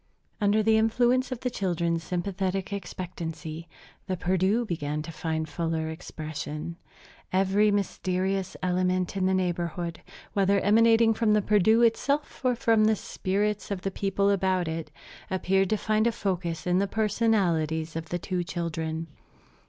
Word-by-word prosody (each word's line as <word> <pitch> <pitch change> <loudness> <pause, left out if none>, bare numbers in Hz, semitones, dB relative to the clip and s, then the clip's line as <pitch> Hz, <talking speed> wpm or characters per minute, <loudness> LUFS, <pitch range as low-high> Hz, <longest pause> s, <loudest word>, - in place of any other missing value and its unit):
Under 210 +1 +3
the 220 0 +4
influence 245 +4 +2
of 255 - -4
the 250 - -1
children's 170 -5 -1
sympathetic 190 +2 -2
expectancy, 170 -4 -6 0.4
the 185 -1 -1
Perdu 190 +6 +1
began 150 -5 -3
to 165 - -7
find 160 -1 -2
fuller 160 +1 -2
expression. 155 0 -6 0.6
Every 195 +3 +3
mysterious 190 -1 -1
element 185 0 0
in 190 -1 +1
the 190 - +2
neighborhood 175 -2 -2 0.3
whether 200 -1 +3
emanating 225 +2 +5
from 220 -1 +2
the 210 - +4
Perdu 215 +3 +4
itself 275 +7 +1
or 250 -1 +3
from 225 -2 +3
the 220 0 +4
spirits 205 +1 -2
of 195 -3 -3
the 195 - -1
people 200 +1 +1
about 185 -2 +1
it 160 -1 -4 0.4
appeared 190 0 +1
to 215 - +2
find 215 +2 +1
a - - +3
focus 180 -6 -2
in 180 +1 +2
the 200 - +1
personalities 185 -8 +1
of 165 -1 -5
the 175 - -1
two 180 0 -2
children. 165 -2 -3
190 Hz, 145 wpm, -27 LUFS, 170-210 Hz, 0.6 s, emanating